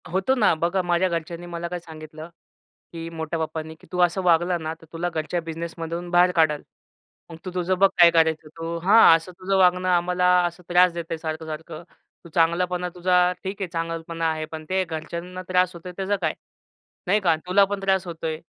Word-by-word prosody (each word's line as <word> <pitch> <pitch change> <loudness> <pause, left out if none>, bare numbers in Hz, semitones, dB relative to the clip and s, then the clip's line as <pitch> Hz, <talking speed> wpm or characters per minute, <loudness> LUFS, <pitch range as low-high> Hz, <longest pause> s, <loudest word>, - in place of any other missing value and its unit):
होतो 190 +9 +1
ना. 215 -8 +4
बघा 175 +4 0
माझ्या 175 +1 +1
घरच्यांनी 170 0 -4
मला 170 0 -5
काय 180 +1 -5
सांगितलं, 155 -1 -11 0.6
की 165 0 -6
मोठ्या 165 0 -4
पप्पानी 160 0 -4
की - - -19
तू 180 - -3
असं 175 +2 +2
वागला 175 0 +3
ना, 160 -1 -4
तर - - -15
तुला 170 +2 -2
घरच्या 165 +1 -3
बिझनेसमधून 165 +1 -5
बाहेर 180 0 +5
काढाल. 155 -3 +3 0.7
मग 165 - -9
तू 185 - -4
तुझं 180 +1 0
बघ 195 0 +6
काय 170 -1 +8
करायचं 160 -1 +2
तू 165 +1 -4
हां, 195 -3 +7
असं 165 +3 -11
तुझं 195 +1 0
वागणं 180 0 +3
आम्हाला 180 0 +2 0.2
असं 175 +1 -5
त्रास 180 0 +5
देत 170 0 -5
सारखं-सारखं. 160 0 -6 0.4
तू 170 - -13
चांगलापणा 180 +2 +1
तुझा 180 0 +3
ठीक 195 +2 -5
आहे 190 - -1
चांगलपणा 165 0 -3
आहे. 155 0 -3
पण 155 0 -8
ते 190 0 +1
घरच्यांना 170 +2 -6
त्रास 180 0 +2
होतोय 170 +2 -8
त्याचं 195 +1 0
काय 160 -2 0 0.7
नाही 200 +4 +3
का. 175 -5 +2
तुला 195 +2 +5
पण 200 0 -4
त्रास 190 -1 +1
होतोय, 165 -2 -4
170 Hz, 190 wpm, -24 LUFS, 165-180 Hz, 0.7 s, काय